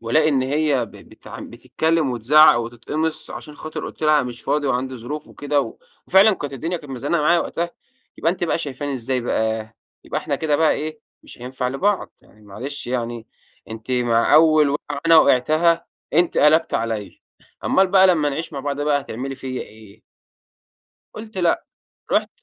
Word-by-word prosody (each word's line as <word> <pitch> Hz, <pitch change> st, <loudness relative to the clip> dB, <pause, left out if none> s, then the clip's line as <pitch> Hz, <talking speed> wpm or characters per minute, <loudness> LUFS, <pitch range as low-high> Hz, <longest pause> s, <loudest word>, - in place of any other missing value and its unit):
وألاقي 150 Hz, +8 st, +2 dB
إن 135 Hz, -3 st, +2 dB
هي 140 Hz, -2 st, +1 dB
ب -, -, -17 dB
بتع -, -, -12 dB
بتتكلّم 135 Hz, +5 st, -1 dB
وتزعق 125 Hz, +4 st, +6 dB
وتتقمص، 120 Hz, +7 st, -4 dB
عشان 150 Hz, -1 st, -9 dB
خاطر 155 Hz, 0 st, -6 dB
قلت -, -, -11 dB
لها 150 Hz, -2 st, +4 dB
مش 125 Hz, -1 st, -7 dB
فاضي 145 Hz, -1 st, 0 dB
وعندي 130 Hz, 0 st, -1 dB
ظروف 145 Hz, +6 st, -7 dB
وكده، 145 Hz, 0 st, -1 dB
و -, -, -6 dB, 0.3 s
وفعلًا 200 Hz, +3 st, +6 dB
كانت 145 Hz, -4 st, -6 dB
الدنيا 165 Hz, +7 st, -3 dB
كانت 145 Hz, -5 st, -10 dB
مزنقة 145 Hz, +6 st, -1 dB
معايا 170 Hz, +3 st, +4 dB
وقتها. 170 Hz, +1 st, -3 dB, 0.5 s
يبقى 165 Hz, -, +1 dB
أنتِ 180 Hz, -, -3 dB
بقى 170 Hz, -, 0 dB
شايفاني 145 Hz, -2 st, -4 dB
إزاي 130 Hz, 0 st, -2 dB
بقى؟ 110 Hz, -2 st, -2 dB, 0.3 s
يبقى -, -, -3 dB
إحنا -, -, -2 dB
كده 150 Hz, -2 st, 0 dB
بقى 160 Hz, 0 st, +3 dB
إيه، 155 Hz, 0 st, -5 dB, 0.2 s
مش -, -, -14 dB
هينفع 125 Hz, +1 st, -4 dB
لبعض. 190 Hz, +10 st, 0 dB
يعني 105 Hz, -, -22 dB
معلش 120 Hz, +9 st, -7 dB
يعني 120 Hz, -2 st, -3 dB, 0.4 s
أنتِ 110 Hz, +3 st, -8 dB
مع 120 Hz, -2 st, +2 dB
أوّل 155 Hz, -2 st, +6 dB
وقعة 145 Hz, 0 st, -4 dB
أنا 165 Hz, -1 st, +7 dB
وقعتها 155 Hz, +5 st, +3 dB, 0.3 s
أنتِ 170 Hz, +2 st, +2 dB
قلبتِ 155 Hz, +2 st, +4 dB
عليَّ، 110 Hz, -3 st, -3 dB, 0.4 s
أمال 190 Hz, -, +3 dB
بقى 190 Hz, 0 st, +5 dB
لمّا 155 Hz, -5 st, +3 dB
نعيش 160 Hz, +3 st, -4 dB
مع 140 Hz, -, -4 dB
بعض 145 Hz, +1 st, -3 dB
بقى 145 Hz, -1 st, +1 dB
هتعملي 135 Hz, +1 st, -6 dB
فيَّ 135 Hz, -, -10 dB
إيه؟ 110 Hz, -1 st, -13 dB, 1.1 s
قلت 215 Hz, -2 st, -9 dB
لأ، 175 Hz, -2 st, +1 dB, 0.5 s
رحت -, -, +2 dB
145 Hz, 170 wpm, -21 LUFS, 125-155 Hz, 1.1 s, أنا